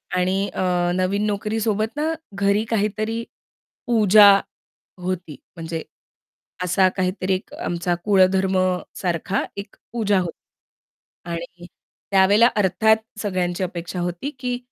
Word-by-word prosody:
आणि 185 +2 +1
अ, - - -3 0.3
नवीन 190 +3 0
नोकरी 210 +1 -1
सोबत 215 0 0
ना, 300 +1 -1 0.3
घरी 200 +2 +1
काहीतरी 215 +1 -1 0.6
पूजा 210 -3 +7 0.7
होती 180 -4 -4 0.2
म्हणजे 165 -1 -5 0.8
असा 185 +1 +3
काहीतरी 185 0 0
एक 185 - -6
आमचा 175 0 -2
कुळधर्म 190 -1 +3 0.4
सारखा 180 +1 -1
एक 200 +1 -8 0.2
पूजा 205 -4 +1
होती. 175 -2 -3 1.0
आणि 170 +1 -7 0.4
त्यावेळेला 200 +4 +5
अर्थात 210 +3 +3 0.2
सगळ्यांची 185 -3 -1
अपेक्षा 175 0 -5
होती 175 +10 -3
की 250 -1 -2
190 Hz, 110 wpm, -22 LUFS, 180-210 Hz, 1.0 s, पूजा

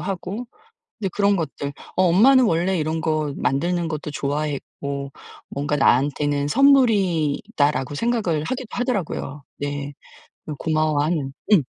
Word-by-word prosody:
하고 195 +5 -4 0.5
이제 195 -3 -1
그런 200 0 +3
것들 150 -4 -4 0.2
어 185 - +3
'엄마는 235 +10 +6
원래 180 0 +1
이런 155 0 -1
거 155 -2 -1
만드는 170 +5 0
것도 155 -2 -4
좋아했고 140 -1 -3 0.4
뭔가 145 +1 -2
나한테는 145 +2 +2
선물이다.'라고 185 - +2
생각을 200 -7 0
하기도 255 +8 -4
하더라고요. 190 - -3 0.2
네 145 0 -3 0.5
그 150 -2 -6
고마워하는 155 -2 0 0.2
음. 190 -7 +7
155 Hz, 290 characters per minute, -22 LUFS, 145-195 Hz, 0.5 s, 음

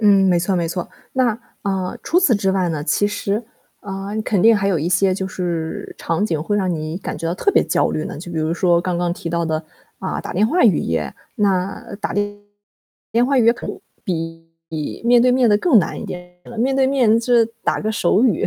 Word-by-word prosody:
嗯， 200 -2 +5
没 175 -1 +4
错 175 +3 0
没 170 -1 0
错。 175 +1 -4 0.2
那， 245 -4 +1 0.2
嗯， 190 -2 -2
除 345 - +2
此 330 -11 +4
之 195 -1 +1
外 190 -2 +1
呢， 155 -3 -2
其 205 +5 +1
实， 205 +1 -2 0.4
嗯， 200 +2 -4
肯 200 -4 +1
定 225 0 +7
还 200 -1 0
有 185 -4 +2
一 155 +3 -1
些 185 +2 +3
就 190 0 -2
是 170 -4 -4
场 165 +4 -1
景 160 -7 -1
会 205 +5 0
让 190 -3 0
你 155 0 -4
感 - - -5
觉 165 - -4
到 170 - -1
特 405 - +1
别 - - +4
焦 - - +1
虑 155 - -2
呢。 - - -6
就 175 +3 -8
比 165 - -2
如 160 +1 0
说 175 -1 +3
刚 180 0 -2
刚 175 0 0
提 175 - -6
到 170 0 0
的， 160 -1 0 0.4
嗯， 190 - -3
打 - - -5
电 205 +5 +3
话 345 +10 +2
语 205 -9 +5
言， 75 -4 -2 0.2
那 195 -1 -1
打 - - -2
电 205 0 -1 0.7
电 235 +2 +3
话 275 0 +2
语 235 - +4
言 235 - +5
可 - - -8
能 - - -5 0.3
比 165 -3 -4 0.2
比 155 +4 -5
面 240 0 +6
对 250 +1 +4
面 250 -3 +4
的 205 - +5
更 280 -3 +5
难 190 - -1
一 - - -6
点 180 0 -8
了。 235 - -10
面 260 +4 +1
对 265 0 +3
面 250 -5 +3
就 245 +1 +1
是 230 - +6 0.2
打 - - +1
个 215 - -1
手 200 +1 +2
语， 220 -10 +2
195 Hz, 260 characters per minute, -20 LUFS, 170-220 Hz, 0.7 s, 定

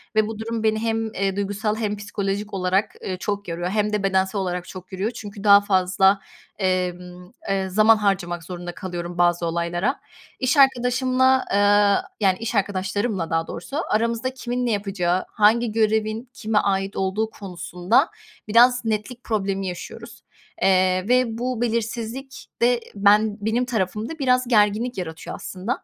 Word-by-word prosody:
ve 215 -1 +3
bu 220 -1 -6
durum 225 0 -3
beni 220 0 +2
hem, 225 -1 -2
eee, 195 0 -1
duygusal 205 +2 -1
hem 210 -2 -2
psikolojik 205 0 -3
olarak, 190 +2 0
ııı, 185 - -3
çok 205 +1 -3
yoruyor 175 +1 -3
hem 210 +1 0
de 210 - 0
bedensel 190 +1 +1
olarak 180 -1 -3
çok 185 0 -10
yoruyor 195 +5 -2
çünkü 210 -3 -9
daha 200 -1 +8
fazla 190 0 +3 0.4
emm, 180 -1 -2 0.2
eee, 195 -1 0
zaman 215 +3 +5
harcamak 185 -5 -1
zorunda 175 0 -7
kalıyorum 175 -1 -6
bazı 175 0 +2
olaylara. 170 - -1 0.4
İş 265 +2 +1
arkadaşımla, 260 0 +3
ııı, 205 0 +4 0.2
yani, 190 -3 +3
iş 230 0 -3
arkadaşlarımla 200 -1 -1
daha 165 0 0
doğrusu 270 - -6
aramızda 230 +3 0
kimin 250 -1 -3
ne 235 - 0
yapacağı, 190 -3 -1
hangi 220 +2 +3
görevin 220 +2 0
kime 220 -5 -2
ait 195 0 -1
olduğu 195 +3 -1
konusunda 185 - 0 0.4
biraz 245 +3 +5
netlik 225 +3 -3
problemi 195 -3 -1
yaşıyoruz, 180 -1 -8 0.4
eee, 185 -1 +3
ve 250 -3 +2
bu 245 0 -2
belirsizlik 235 +3 -3
de 240 0 +4 0.2
ben 205 +1 +4
benim 235 +3 +1
tarafımda 220 - -3
biraz 255 -2 +2
gerginlik 220 +2 +2
yaratıyor 160 -3 -6
aslında. 190 +5 -5
205 Hz, 150 wpm, -23 LUFS, 185-230 Hz, 0.4 s, daha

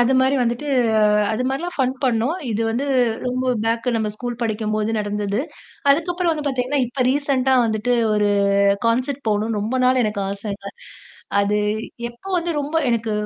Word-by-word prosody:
அது 245 +2 +3
மாரி 265 +2 +3
வந்துட்டு 240 +5 -2 0.6
அது 235 - -1
மாரிலாம் 340 +7 -3
ஃபன் 260 -1 +1
பண்ணோம். 245 +4 +1 0.2
இது 225 +1 -1
வந்து 240 +5 -1 0.4
ரொம்ப 255 +1 -1 0.2
பேக்கு, 230 +2 0
நம்ம 220 -1 0
ஸ்கூல் 240 +1 -5
படிக்கும்போது 215 -1 -1
நடந்தது. 205 0 -2 0.5
அதுக்கப்புறம் 345 +4 +1
வந்து 300 -2 -4
பார்த்தீங்கன்னா, 265 +1 0
இப்ப 255 +2 -2
ரீசென்ண்டா 270 -1 +2
வந்துட்டு 220 +2 0 0.2
ஒரு 210 -1 +2 0.6
கான்செர்ட் 255 +4 0
போகணுன்னு 215 +1 0
ரொம்ப 220 +5 -2
நாள் 255 0 +4
எனக்கு 210 -1 -1
ஆசைங்க. 200 0 -5 0.7
அது 205 +1 +1 0.5
எப்போ 240 +11 -11
வந்து 345 0 -1
ரொம்ப 290 +2 -4
எனக்கு 230 -2 0
240 Hz, 150 wpm, -21 LUFS, 215-270 Hz, 0.7 s, நாள்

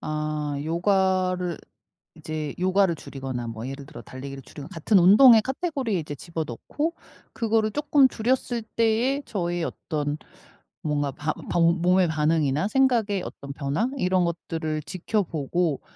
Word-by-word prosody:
아 150 -1 -2
요가를 185 +1 +1 0.6
이제 155 -2 -5
요가를 185 -1 +3
줄이거나 130 -5 -6
뭐 115 +1 -6
예를 135 0 -7
들어 150 - -10
달리기를 135 +1 -8
줄이거나 140 +3 -10
같은 190 +3 +2
운동의 220 +5 +8
카테고리에 265 - -2
이제 150 -2 -6
집어넣고 165 - -4 0.4
그거를 220 -2 +1
쪼끔 290 -2 +4
줄였을 245 0 -1
때에 230 +5 +1
저의 175 -4 -2
어떤 150 -3 -3 0.7
뭔가 145 -2 0
반 150 +3 -3 0.2
반 170 - +2 0.2
몸의 180 +1 +4
반응이나 155 +1 +1
생각의 225 -7 +2
어떤 140 0 -8
변화 145 - -1
이런 185 -5 +2
것들을 160 -2 -3
지켜보고 170 -3 -1
175 Hz, 310 characters per minute, -25 LUFS, 150-215 Hz, 0.7 s, 운동의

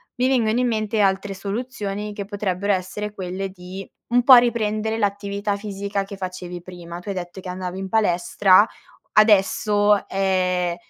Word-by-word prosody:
mi 250 0 +1
vengono 240 -3 +2
in 250 - +2
mente 215 -1 -1
altre 195 0 +1
soluzioni 210 0 -4
che 205 -1 -5
potrebbero 200 -1 -1
essere 200 +3 -4
quelle 190 0 -4
di 185 +1 -9 0.2
un 245 0 +4
po' 260 +1 +10
riprendere 220 -2 +2
l'attività 200 -1 -1
fisica 200 -1 -3
che 200 0 -9
facevi 180 -2 -6
prima. 175 -1 -9
Tu 180 - -16
hai 200 - -3
detto 180 +1 -6
che 185 - -10
andavi 180 0 -5
in 195 - -4
palestra: 195 0 +4 0.5
adesso, 210 -1 +4
ehm, 185 -2 0
200 Hz, 155 wpm, -22 LUFS, 185-210 Hz, 0.5 s, po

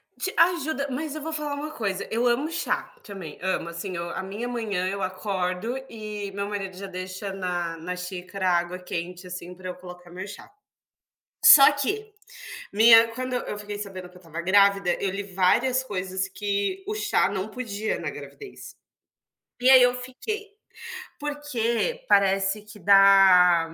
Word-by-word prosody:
Te 380 - -3
ajuda, 315 -5 +2
mas 290 +3 -4
eu 310 - -6
vou 320 +2 -5
falar 300 -2 -3
uma 290 +2 -4
coisa, 200 -9 -3
eu 230 +2 0
amo 245 +6 +1
chá 345 +8 -2
também, 190 -7 -9
amo 185 -2 -2
assim 185 +2 -6
eu 170 0 -4
a 190 - -4
minha 205 +6 -5
manhã 215 -7 -2
eu 195 +1 -3
acordo 185 +4 -2
e 210 -3 -6
meu 200 +1 -4
marido 195 -3 -5
já 195 +1 -7
deixa 185 +1 -6
na 175 -3 -3
na 180 +3 -5
xícara 185 +1 -4
a 175 - +4
água 175 +1 -3
quente, 180 0 -6
assim, 180 0 -7
para 185 +1 -10
eu 180 - -6
colocar 180 -1 -12
meu 180 +2 -7
chá. 205 - -11 0.9
Só 275 0 +10
que, 415 +10 -3 0.6
minha 225 +2 +7
quando 255 0 -4
eu 250 - 0
eu 210 - -5
fiquei 205 0 -7
sabendo 190 -3 -7
que 180 - -17
eu - - -15
estava 165 -1 -7
grávida, 195 0 +4
eu 195 - 0
li 195 +2 -4
várias 200 +7 +2
coisas 190 -4 -3
que 200 - -2
o 425 - -2
chá 425 - +1
não 195 0 -3
podia 220 -2 -4
na - - -3
gravidez. 415 -3 -11 0.9
E 255 - +5
aí 260 -1 +9
eu 245 0 +4
fiquei 400 - -6 0.7
porque 295 - -2
parece 195 +1 +3
que 210 0 -14
dá, 195 -4 +6
200 Hz, 170 wpm, -25 LUFS, 185-250 Hz, 0.9 s, Só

